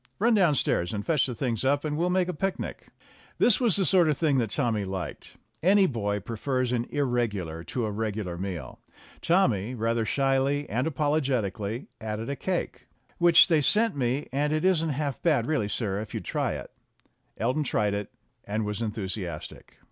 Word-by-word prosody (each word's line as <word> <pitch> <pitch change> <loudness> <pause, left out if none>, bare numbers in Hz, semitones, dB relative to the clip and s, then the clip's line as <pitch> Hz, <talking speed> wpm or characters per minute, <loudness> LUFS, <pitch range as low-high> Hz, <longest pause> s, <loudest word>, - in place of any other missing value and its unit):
"Run 230 +4 +3
downstairs 150 - +2
and 100 - -4
fetch 150 -6 +2
the 125 - -4
things 115 -2 -2
up, 140 +3 +1
and 150 -1 -1
we'll 170 +3 +1
make 180 0 +2
a 180 - -2
picnic." 190 +5 -4 0.5
This 240 - +5
was 230 -7 +3
the 195 - +1
sort 175 -4 +4
of 150 - +1
thing 150 -5 +2
that 115 -3 0
Tommy 115 -4 0
liked; 95 -2 -6 0.3
any 195 +3 +5
boy 105 - -1
prefers 125 +4 -2
an 120 -1 0
irregular 105 - -1
to 120 +7 -2
a 105 - -2
regular 105 -4 -3
meal. 90 -1 -6 0.4
Tommy, 125 - +2
rather 115 0 0
shyly 135 +4 +1
and 125 +7 -1
apologetically, 130 -8 -1 0.2
added 110 +3 -4
a - - -2
cake, 180 +7 -3 0.3
"Which 170 -1 +7
they 160 -4 +3
sent 220 +8 +3
me, 130 +1 -1
and 145 +3 0
it 155 +3 0
isn't 165 -4 +3
half 140 -1 -2
bad 160 -5 +2
really, 145 -10 0
sir, 100 -3 -2
if 110 - -8
you'd - - -4
try - - -1
it." - - -7 0.7
Elton 125 +7 0
tried 105 -6 0
it, 100 0 -4 0.3
and 105 +1 -2
was 105 +2 -3
enthusiastic. 95 -7 -5
130 Hz, 180 wpm, -27 LUFS, 105-155 Hz, 0.7 s, Which